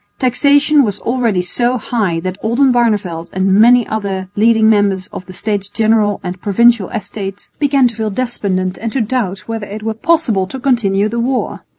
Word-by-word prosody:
Taxation 285 +3 +3
was 205 -4 -2
already 230 -7 0
So 240 +7 +1
high 210 -7 -2
that 185 +2 -5
Oldenbarneveldt 225 -8 +1
and 190 +1 +1
many 235 +3 +5
other 195 -3 -4
leading 220 +1 +3
members 200 -3 +2
of 180 - -8
the 185 - -10
States 200 0 -3
General 215 -1 +1
and 180 0 -6
Provincial 225 0 +3
Estates 200 -3 -6
began 280 -3 +3
to 235 - -5
feel 220 -1 -2
despondent 195 -5 -2
and 225 0 -4
to 270 - 0
doubt 210 -5 -2
whether 225 -2 -5
it 210 +1 -8
were 220 0 -2
possible 225 - +1
to 265 +8 -7
continue 215 -6 +1
the 235 +2 -3
war. 255 +2 -2
220 Hz, 175 wpm, -15 LUFS, 195-240 Hz, -, many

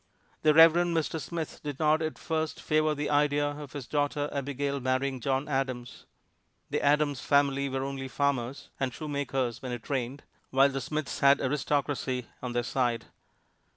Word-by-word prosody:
The 155 -1 +4
Reverend 165 +1 +6
Mr. 160 0 -1
Smith 165 -1 -5
did 145 -2 -4
not 155 +1 +3
at 155 -1 -2
first 160 -1 -2
favor 155 0 +1
the 150 +1 -2
idea 145 0 +3
of 145 -2 -9
his 145 -4 -5
daughter 145 +1 0
Abigail 140 0 -2
marrying 130 +1 0
John 135 +2 0
Adams. 130 -3 -3 0.6
The - - 0
Adams 145 -1 +2
family 140 0 +2
were 135 0 -2
only 135 -1 -4
farmers 135 -2 -1
(and 135 -2 0
shoemakers 135 -5 -2
when 130 -2 -5
it 120 -2 -6
rained), 130 +1 -2 0.3
while 135 +1 +5
the 135 0 -3
Smiths 150 +2 -3
had 140 0 +6
aristocracy 140 -2 -1 0.2
on 125 -1 -4
their 120 0 0
side. 120 -2 0
140 Hz, 160 wpm, -29 LUFS, 130-150 Hz, 0.6 s, Reverend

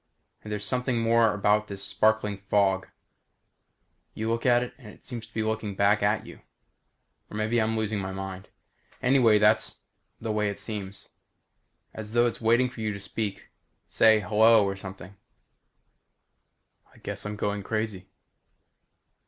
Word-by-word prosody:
And 105 - -9
there's 105 -1 -3
something 125 0 0
more 115 -1 +4
about 105 +1 +1
this 100 -1 -6
sparkling 110 -2 +1
fog. 95 -2 +2 1.3
You 110 +1 -2
look 115 +2 -1
out 120 0 +4
at 125 - -5
it - - -24
and 120 - -13
it 105 - -14
seems 115 -3 -7
to 110 - -27
be 110 - 0
looking 110 -2 -2
back 100 +1 +3
at 105 +1 +1
you. - - -12 0.9
Or 105 - -7
maybe 110 +2 +1
I'm 110 +1 0
losing 110 -1 -1
my 95 0 -4
mind. 95 0 -6 0.6
Anyhow, 125 -4 +5
that's 105 +1 +2 0.4
the 110 -1 -3
way 105 -1 0
it 100 - -5
seems. 100 -3 -6 0.8
As 110 0 -8
though 120 0 +4
it's 120 - -2
waiting 120 +3 +3
for 120 -2 -9
you 110 -1 -1
to 100 - -7
speak 100 +1 -3
to - - -19
it - - -27 0.4
say 110 -1 +5
hello 110 +2 +5
or 100 0 -2
something. 95 0 -10 1.8
I - - -21
guess - - -5
I'm 105 0 -4
going 105 0 -2
crazy. 110 -2 -3
105 Hz, 165 wpm, -27 LUFS, 100-115 Hz, 1.8 s, Anyhow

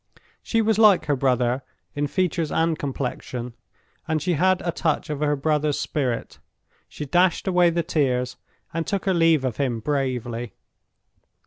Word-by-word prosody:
She 225 -1 +1
was 220 0 +2
like 205 -7 +6
her 145 -2 +1
brother 125 -1 +1 0.3
in 145 0 -1
features 170 -1 -1
and 165 0 +1
complexion, 125 -3 -4 0.5
and 160 0 +1
she 180 +2 0
had 185 +4 +3
a 170 - 0
touch 160 -2 -1
of 145 - -3
her 150 -1 +1
brother's 150 0 0
spirit; 130 -6 -2 0.5
she 150 - -6
dashed 175 +6 +2
away 180 -2 +4
the 170 0 0
tears, 125 -6 0 0.4
and 165 0 -2
took 200 0 -2
her 190 - +2
leave 165 -5 +3
of 120 -4 -2
him 125 -5 -1
bravely. 125 -4 -2
150 Hz, 155 wpm, -24 LUFS, 130-170 Hz, 0.5 s, like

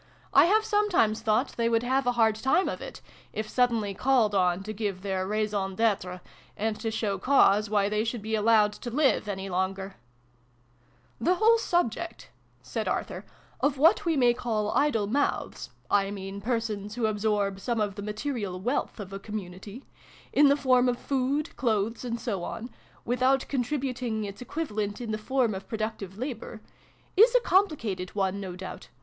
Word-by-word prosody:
I - - +7
have 430 +5 +3
sometimes 370 - +2
thought 225 +4 +1
they 230 -1 +2
would 230 0 +2
have 260 +1 +1
a 245 - +3
hard 225 -2 +4
time 265 - +1
of - - -4
it, - - -8 0.3
if 215 0 -3
suddenly 230 -4 +1
called 235 -1 +2
on 180 -1 +2
to 215 +2 -5
give 200 -3 -3
their 190 -1 -1
raison 205 -2 -1
detre, 190 -5 0 0.4
and 220 +1 -1
to 225 - -2
show 205 -3 -2
cause 210 -4 +4
why 205 -2 +2
they 210 +1 0
should 230 -1 -3
be 220 +1 -4
allowed 215 -1 +4
to 240 - -7
live 270 -3 +2
any 195 -1 -4
longer! 190 +1 -2 0.4
" 120 0 -37 0.2
" 120 - -33
The 355 +10 +3
whole 450 +4 +4
subject," 340 - -1 0.3
said - - -4
Arthur, - - -2 0.2
" - - -31
of 280 -1 +1
what 340 - +5
we 330 -4 +1
may 245 -2 +5
call 215 -3 -1
'idle 280 -8 +2
mouths' 275 +8 -1 0.2
(I 200 -1 +3
mean 195 0 -6
persons 215 -2 -2
who 240 -2 0
absorb 205 -2 0
some 235 +2 -1
of 205 -2 0
the 205 - -7
material 210 -3 -3
wealth 240 +3 -2
of 195 -2 -7
a 195 - -5
community 205 +3 -8 0.5
in 290 0 +6
the 280 +1 +4
form 255 -3 +3
of 245 - -1
food, 275 +3 -1
clothes, 225 -1 0
and 235 -1 -3
so 200 -8 -3
on 230 +6 -6 0.3
without 255 +3 +2
contributing 250 -4 -2
its 200 +1 -7
equivalent 215 -8 -3
in 235 -3 -4
the 215 - -2
form 245 0 +1
of 190 0 -7
productive 215 -3 -4
labour] 235 -3 -5 0.6
is 460 +5 +6
a - - +8
compli 375 -6 +3 0.2
cated 180 +1 -7
one, 195 -1 0
no 190 -3 -6
doubt. 185 0 -8
220 Hz, 180 wpm, -27 LUFS, 200-255 Hz, 0.6 s, a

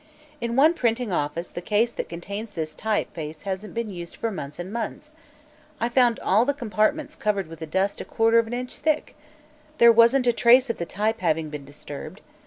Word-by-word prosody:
"In 235 0 -2
one 300 +5 +6
printing 240 - 0
office 165 +1 -2
the 175 - -6
case 215 +5 +1
that - - -5
contains 200 +6 -6
this 155 -3 -4
type 215 +3 -1
face 155 -1 -7
hasn't 200 +2 -5
been 230 -2 -2
used 175 -2 -8
for 230 - -2
months 150 -7 -6
and 180 +3 -6
months. 235 +6 -5 0.7
I 235 - 0
found 245 -2 +3
all 210 +5 +4
the 285 +2 0
compartments 240 +5 0
covered 200 -3 0
with 160 -1 -9
dust 190 +4 0
a - - -7
quarter 225 0 +3
of 230 - 0
an 230 - -6
inch 250 +1 -5
thick. 305 0 0 0.6
There 235 0 +8
wasn't 235 +3 +5
a 240 - +4
trace 245 +2 +5
of - - -9
the 170 - -3
type 220 +3 -1
having 160 -4 0
been 150 -2 -7
disturbed. 145 +6 -9
215 Hz, 200 wpm, -25 LUFS, 175-235 Hz, 0.7 s, There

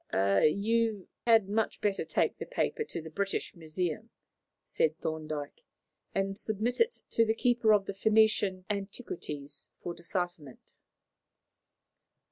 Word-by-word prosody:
"You 200 - +2 0.2
had 225 -4 +6
much 215 +2 0
better 205 -2 0
take - - 0
the - - -5
paper - - -1
to 305 - -4
the 160 - -9
British 195 +3 -2
Museum," 165 0 -3 0.5
said 155 0 0
Thorndyke, 155 - -4 0.5
"and 195 0 -1
submit 220 +3 -1
it 460 +1 +2
to 230 - +4
the 220 0 +1
keeper 240 -2 +3
of 205 -2 +4
the 200 - -4
Phoenician 210 -2 +3
antiquities 180 - -4
for 175 - -5
decipherment." 170 -5 -5
195 Hz, 120 wpm, -31 LUFS, 160-220 Hz, 0.5 s, had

